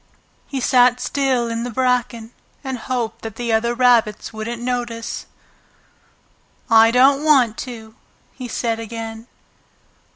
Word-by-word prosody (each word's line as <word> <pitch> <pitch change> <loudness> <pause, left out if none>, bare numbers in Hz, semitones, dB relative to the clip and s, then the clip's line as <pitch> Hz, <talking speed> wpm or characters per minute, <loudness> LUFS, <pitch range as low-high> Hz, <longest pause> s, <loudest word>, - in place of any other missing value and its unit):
He 275 - -4
sat 250 -1 +4
still 265 -4 0
in 230 0 -3
the 245 - -4
bracken, 240 -2 -1 0.3
and 265 -3 -4
hoped 235 -2 -3
that 225 -2 -7
the 235 -2 -2
other 235 +2 +1
rabbits 235 -4 +2
wouldn't 220 +2 -5
notice. 240 -2 -4 1.4
"I 225 0 +7
don't 270 +4 +4
want 260 -8 +4
to!" 220 -2 -10 0.4
he 255 - -7
said 230 -1 -2
again. 225 0 -7
240 Hz, 125 wpm, -20 LUFS, 225-250 Hz, 1.4 s, I